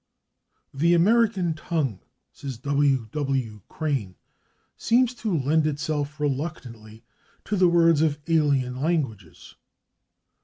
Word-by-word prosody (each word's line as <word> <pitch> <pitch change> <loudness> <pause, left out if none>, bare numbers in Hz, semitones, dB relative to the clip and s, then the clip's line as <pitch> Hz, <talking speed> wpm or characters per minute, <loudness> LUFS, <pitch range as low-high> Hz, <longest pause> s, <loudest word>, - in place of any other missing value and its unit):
"The 165 +5 +3
American 200 -2 +3
tongue," 155 - -2 0.3
says 135 -4 -7
W. 140 -2 +1
W. 135 -8 -2
Crane, 135 - -3 0.6
"seems 245 +1 +2
to 215 -7 -2
lend 155 +3 +1
itself 150 0 -3
reluctantly 125 -7 -5 0.4
to 210 - -1
the 185 -2 +4
words 165 -3 +4
of 155 -2 +1
alien 140 -6 +1
languages." 135 - -3
150 Hz, 105 wpm, -24 LUFS, 130-165 Hz, 0.6 s, the